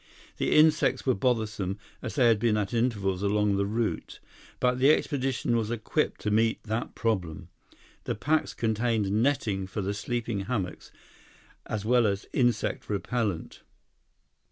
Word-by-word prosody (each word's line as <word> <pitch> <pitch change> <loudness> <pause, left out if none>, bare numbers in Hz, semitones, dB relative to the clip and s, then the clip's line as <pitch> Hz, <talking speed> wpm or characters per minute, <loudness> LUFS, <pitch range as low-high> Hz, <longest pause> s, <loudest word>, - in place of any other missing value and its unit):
The - - +1
insects 155 0 +4
were 130 - +3
bothersome, 105 -4 -1 0.2
as 125 - -5
they 130 -4 +4
had 115 -2 +4
been 110 -1 +2
at 105 +1 -2
intervals 105 -6 0
along 105 0 +2
the 100 0 0
route, 110 +2 -2 0.4
but 125 0 +1
the 135 +2 +5
expedition 135 -5 +1
was 110 -2 0
equipped 115 -2 -1
to 105 - -1
meet 110 +1 +2
that 110 +2 -3
problem. 90 -7 -2 0.6
The - - -1
packs 155 +9 0
contained 110 -2 0
netting 110 -4 +1
for 100 +2 -4
the 100 +2 -1
sleeping 115 0 -3
hammocks, 95 -6 -4 0.8
as 105 -1 -3
well 120 -1 +4
as 100 -1 -2
insect 120 -2 0
repellent. 105 -3 -2
110 Hz, 145 wpm, -28 LUFS, 100-120 Hz, 0.8 s, the